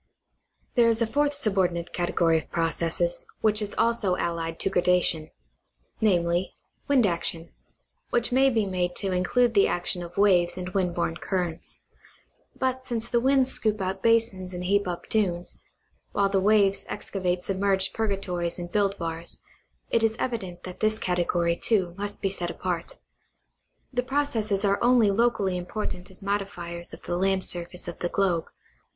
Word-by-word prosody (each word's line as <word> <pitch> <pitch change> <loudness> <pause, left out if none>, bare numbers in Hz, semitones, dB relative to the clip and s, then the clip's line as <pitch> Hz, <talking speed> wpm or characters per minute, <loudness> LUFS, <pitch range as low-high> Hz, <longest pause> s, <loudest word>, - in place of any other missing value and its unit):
There 240 -2 +4
is 230 -1 +3
a - - +2
fourth 290 +5 +1
subordinate 185 -9 +1
category 170 -2 +2
of 150 - -13
processes, 170 - 0 0.2
which 215 0 +3
is 205 -1 -3
also 230 -6 +2
allied 165 -1 -3
to - - +1
gradation, 180 -4 +2 0.7
viz: 175 -3 +2 0.4
wind 275 -5 +4
action, 170 -2 -1 0.6
which 240 0 +1
may 265 +2 +5
be 225 -5 +1
made 180 -2 -1
to 195 -2 0
include 230 +7 +2
the 200 -3 +5
action 175 0 -1
of 175 +1 -9
waves 185 -4 +4
and 180 0 -4
wind 185 -2 -1
born 165 -1 -1
currents; 175 -4 -3 0.7
but 260 0 -1
since 235 -2 -3
the 240 - +2
winds 265 +1 +3
scoop 215 -1 +1
out 190 0 -3
basins 225 -6 +1
and 180 - -4
heap 200 +2 +1
up 175 -1 -5
dunes, 180 -5 -1 0.5
while 200 -1 +2
the 195 -1 +1
waves 200 -1 +3
excavate 185 -3 -2
submerged 195 0 +1
purgatories 195 -5 -2
and 175 -1 -6
build 200 0 +1
bars, 165 0 -2 0.5
it 230 - +3
is 225 0 +1
evident 195 -10 -4
that 180 -1 -8
this 215 0 +4
category, 175 -2 0
too, 185 -3 +1
must 205 +1 -4
be 195 - +1
set 175 -3 -1
apart. 175 -1 -4 1.0
The 245 - +1
processes 240 -7 0
are 200 0 +1
only 240 -4 +5
locally 200 -4 +1
important 180 0 -5
as 190 0 -12
modifiers 175 -4 -3
of - - -11
the 175 - -2
land 190 0 +1
surface 175 0 -1
of 175 - -6
the 175 - -1
globe. 175 -5 +1
195 Hz, 160 wpm, -26 LUFS, 175-220 Hz, 1.0 s, may